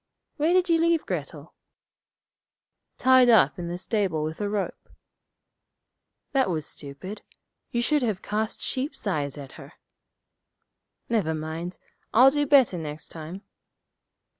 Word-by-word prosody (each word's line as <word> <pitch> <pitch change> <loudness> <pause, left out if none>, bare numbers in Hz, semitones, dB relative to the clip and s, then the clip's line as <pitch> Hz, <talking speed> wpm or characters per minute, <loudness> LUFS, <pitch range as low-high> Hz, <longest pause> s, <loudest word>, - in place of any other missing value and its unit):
'Where 310 +3 +2
did 365 0 +3
you 330 -1 +3
leave 335 -1 +2
Grettel?' - - -5 1.4
'Tied 255 -1 +6
up 200 - +5
in 175 - -4
the 175 +1 -4
stable 185 -5 -1
with 155 +5 -4
a 205 - -1
rope.' 205 -1 -4 1.4
'That 265 -6 +2
was 160 -4 -2
stupid. 150 +9 -7 0.5
You 240 0 -1
should 295 +3 +2
have 215 -6 -1
cast 215 +1 -2
sheep's 265 +1 -3
eyes 145 -8 -1
at 140 -2 -9
her.' - - -13 1.3
'Never 195 -9 0
mind; 160 +3 -5 0.4
I'll 255 +4 +8
do 290 0 0
better 265 - +5
next 155 -1 -7
time.' 165 +5 -8
205 Hz, 130 wpm, -26 LUFS, 160-260 Hz, 1.4 s, I'll